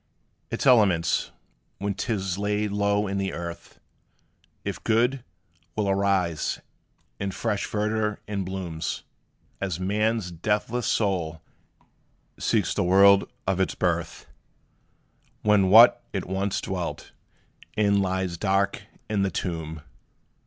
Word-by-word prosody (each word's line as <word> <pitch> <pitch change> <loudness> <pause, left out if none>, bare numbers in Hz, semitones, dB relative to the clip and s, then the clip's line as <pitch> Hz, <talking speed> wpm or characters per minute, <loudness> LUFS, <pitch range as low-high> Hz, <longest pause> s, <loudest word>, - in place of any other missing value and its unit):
Its - - -3
elements, 95 -10 +4 0.5
when 100 0 -2
't 115 - -3
is 95 -3 -2
laid 105 0 0
low 100 0 +1
in 100 0 -2
the 95 -1 -2
earth, 85 0 -7 0.9
If - - -4
good, 120 +3 +2 0.5
will 105 -2 0
arise 95 -4 +1 0.6
in 100 - -2
fresh 105 +1 -2
verdure 105 0 -1
and 100 -2 -2
bloom; 90 -4 -5 0.8
As 95 -4 -2
man's 105 +1 0
deathless 105 +7 -1
soul 85 -7 0 1.0
seeks - - +1
the - - 0
world 100 +2 +6 0.2
of 95 -1 0
its 95 - 0
birth, - - -1 1.2
When 105 -3 +4
what 115 +4 +8
it - - -2
once 95 +1 -1
dwelt 90 -3 -4 0.7
in 100 -2 +3
lies 95 -2 -1
dark 100 +1 +1 0.3
in 105 -2 0
the 100 - +2
tomb. 80 -5 -4
100 Hz, 115 wpm, -26 LUFS, 95-105 Hz, 1.2 s, what